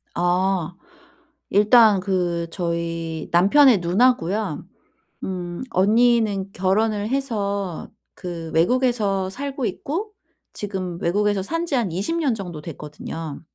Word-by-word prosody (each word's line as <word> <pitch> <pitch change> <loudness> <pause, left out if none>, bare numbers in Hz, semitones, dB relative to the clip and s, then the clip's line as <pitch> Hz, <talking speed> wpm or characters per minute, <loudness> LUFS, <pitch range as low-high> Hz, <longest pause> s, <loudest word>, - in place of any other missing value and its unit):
아 180 0 +1 0.8
일단 210 0 +5
그 175 -3 -1
저희 165 -2 -3
남편의 205 +7 +6
누나고요. 205 +2 +1 0.6
음 175 -1 -4
언니는 210 -1 +2
결혼을 205 +3 0
해서 200 - -2 0.3
그 170 -3 -6
외국에서 205 0 +1
살고 275 +2 -4
있고 365 - -3 0.4
지금 185 -4 -4
외국에서 205 +3 +1
산 330 - -2
지 315 - -1
한 230 -8 0
20 200 - -2
년 295 -7 +1
정도 175 -7 -7
됐거든요. 150 0 -7
195 Hz, 210 characters per minute, -22 LUFS, 175-230 Hz, 0.8 s, 남편의